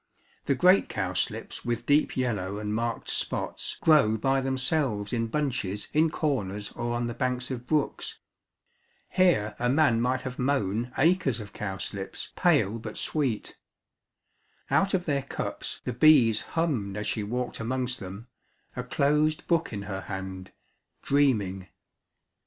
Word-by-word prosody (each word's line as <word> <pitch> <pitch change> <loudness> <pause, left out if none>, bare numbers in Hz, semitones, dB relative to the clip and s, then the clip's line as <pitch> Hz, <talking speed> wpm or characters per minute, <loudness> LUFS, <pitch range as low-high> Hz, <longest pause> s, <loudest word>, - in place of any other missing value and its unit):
The 140 - +3
great 180 +7 +5
cowslips - - -3
with 120 -1 -2
deep 145 0 +3
yellow 105 -6 -1
and 105 0 -3
marked 115 +1 -2
spots - - -2
grow 140 -9 +5
by 135 +4 +1
themselves 130 -5 0
in 115 -1 0
bunches 115 -7 -2
in 160 +2 +4
corners 105 - -2
or 120 0 -3
on 120 0 -1
the 120 - -3
banks 125 +1 -2
of 125 -1 -5
brooks. 150 -1 -1 0.9
Here 165 - +3
a 125 - +1
man 130 -4 +3
might 130 +1 +1
have 130 -1 -6
mown 125 -3 0
acres 160 -6 +3
of 105 -2 -9
cowslips, 95 -1 -5
pale 115 - +3
but 110 -1 -7
sweet. 135 -8 -2 1.1
Out 195 0 +3
of 180 -1 -1
their 140 -3 +1
cups 135 - -5
the 125 - -3
bees 125 -5 +6 0.2
hummed 120 -12 0
as 105 - -3
she 110 - -1
walked 120 +4 -3
amongst 125 +2 -2
them, 95 +4 -8 0.5
a 125 - -3
closed 150 +4 +1
book 170 -1 +1
in 100 -3 -4
her 95 -1 -4
hand, 95 -1 -6 0.5
dreaming. 105 -10 +1
125 Hz, 140 wpm, -27 LUFS, 105-145 Hz, 1.1 s, bees